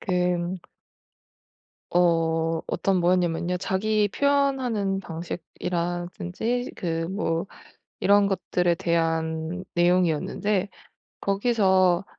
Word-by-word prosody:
그 180 -1 0 1.3
어 165 -2 +2
어떤 195 -2 0
뭐였냐면요. 175 0 +1
자기 205 +3 +1
표현하는 260 -7 +1
방식이라든지 175 +6 -3
그 165 -2 -2
뭐 170 -4 -1 0.6
이런 200 0 +5
것들에 180 -2 0
대한 165 +1 -1
내용이었는데 180 +3 +1 0.5
거기서 195 -4 +2
180 Hz, 190 characters per minute, -25 LUFS, 170-200 Hz, 1.3 s, 이런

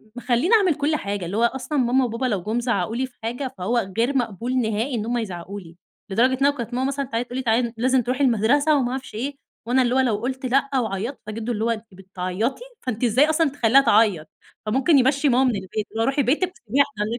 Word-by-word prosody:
مخليني 245 - +1
أعمل 375 -7 +3
كل 300 +2 0
حاجة، 200 -7 -3
اللي 185 +5 -3
هو 230 - +2
أصلًا 265 +5 -1
ماما 255 0 +3
وبابا 235 +2 -3
لو 205 -8 -1
جُم 220 +4 -1
زعقوا 225 -4 -1
لي 260 +2 0
في 255 - -16
حاجة، 245 +3 -4
فهو 195 +1 -1
غير 250 +4 +2
مقبول 240 +1 -2
نهائي 230 +2 -1
إن 220 -2 -2
هُم 240 +1 -1
يزعقوا 195 -3 -5
لي، 165 -3 -14 0.3
لدرجة 250 +6 +2
إن - - +4
هو 285 - +5
لو 285 - -13
كانت 235 0 -5
ماما 260 +2 0
مثلًا 275 0 -2
تع 230 -2 -2
تقول 245 +1 -6
لي 260 - -2
تعالي 235 0 +1
لازم 255 +2 +2
ترُوحي 250 +4 -1
المدرسة 275 +6 +3
وما 245 -3 0
أعرفش 265 -3 -6
إيه، 275 +6 -3 0.3
وأنا 255 +3 +2
اللي 245 0 +1
هو 265 - +3
لو 245 -5 +2
قلت 260 +4 -4
لأ 275 +2 +1
وعيّطت 220 +3 -3
فجدو 220 +2 -4
اللي 220 -1 -2
هو 235 - +1
أنتِ 230 -1 -2
بتعيطي! 190 - -3 0.2
فأنتِ 250 -3 -4
إزاي 250 +6 +4
أصلًا 315 -1 +2
تخليها 270 -1 +4
تعيّط، 205 - +3 0.4
فممكن 265 +8 +3
يمشّي 275 +3 +3
ماما 255 +1 +3
من 250 -4 +2
البيت، 190 -2 -8 0.2
يقول - - -8
لها 225 - +2
رُوحي 275 +2 +1
بيتِك 320 +9 +1
وسيبيها 265 - +1
وإحنا 210 - 0
245 Hz, 235 wpm, -23 LUFS, 220-265 Hz, 0.4 s, هو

